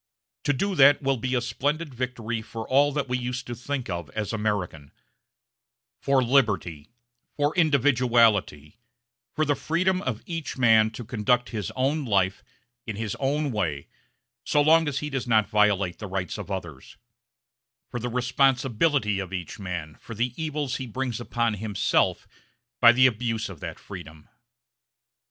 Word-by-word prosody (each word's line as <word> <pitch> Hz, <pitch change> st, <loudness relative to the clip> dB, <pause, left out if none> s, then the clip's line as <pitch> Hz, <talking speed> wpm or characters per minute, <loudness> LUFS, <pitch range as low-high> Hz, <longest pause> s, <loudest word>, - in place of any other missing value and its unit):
To 145 Hz, -, +3 dB
do 195 Hz, +9 st, -1 dB
that 140 Hz, +1 st, +6 dB
will 135 Hz, 0 st, +1 dB
be 130 Hz, +3 st, -2 dB
a 120 Hz, -, +1 dB
splendid 145 Hz, +5 st, -2 dB
victory 120 Hz, -2 st, -3 dB
for 110 Hz, 0 st, -7 dB
all 145 Hz, +2 st, +4 dB
that 145 Hz, -1 st, -2 dB
we 125 Hz, 0 st, -1 dB
used 125 Hz, 0 st, -4 dB
to 120 Hz, -, -5 dB
think 130 Hz, +2 st, -4 dB
of 85 Hz, -5 st, -5 dB
as 110 Hz, 0 st, -3 dB
American 100 Hz, -9 st, -3 dB, 1.1 s
for 135 Hz, -2 st, +3 dB
liberty, 100 Hz, -, +1 dB, 0.5 s
for 145 Hz, 0 st, +1 dB
individuality, 120 Hz, -, +2 dB, 0.6 s
for 155 Hz, -, +1 dB
the 145 Hz, -, +2 dB
freedom 185 Hz, +6 st, 0 dB
of 115 Hz, -4 st, -4 dB
each 165 Hz, -5 st, -5 dB
man 110 Hz, -3 st, +5 dB
to 120 Hz, +1 st, -7 dB
conduct 120 Hz, +2 st, +1 dB
his 105 Hz, -6 st, -3 dB
own 140 Hz, +4 st, 0 dB
life 95 Hz, -5 st, +1 dB, 0.4 s
in 110 Hz, -, -4 dB
his 110 Hz, -1 st, -3 dB
own 145 Hz, +1 st, 0 dB
way 80 Hz, -11 st, -2 dB, 0.5 s
so 150 Hz, -, +1 dB
long 160 Hz, +2 st, +5 dB
as 145 Hz, -1 st, -2 dB
he 150 Hz, -, -5 dB
does 135 Hz, -2 st, -3 dB
not 110 Hz, -3 st, +3 dB
violate 100 Hz, -4 st, +2 dB
the 105 Hz, -, -6 dB
rights 95 Hz, +1 st, -4 dB
of 100 Hz, -, -7 dB
others, 85 Hz, -8 st, -7 dB, 0.9 s
for 120 Hz, -, -3 dB
the 125 Hz, +1 st, -3 dB
responsibility 125 Hz, -2 st, +1 dB
of 95 Hz, -2 st, -5 dB
each 90 Hz, +3 st, -6 dB
man 85 Hz, -5 st, -5 dB
for 115 Hz, -, -9 dB
the 120 Hz, +3 st, -1 dB
evils 150 Hz, -4 st, -3 dB
he 130 Hz, -, -6 dB
brings 125 Hz, 0 st, -3 dB
upon 115 Hz, -1 st, -1 dB
himself 105 Hz, -1 st, 0 dB, 0.5 s
by 120 Hz, -1 st, +9 dB
the 130 Hz, +2 st, +4 dB
abuse 115 Hz, -2 st, 0 dB
of 90 Hz, -6 st, -10 dB
that -, -, -6 dB
freedom. 75 Hz, 0 st, -11 dB
120 Hz, 160 wpm, -25 LUFS, 105-135 Hz, 1.1 s, by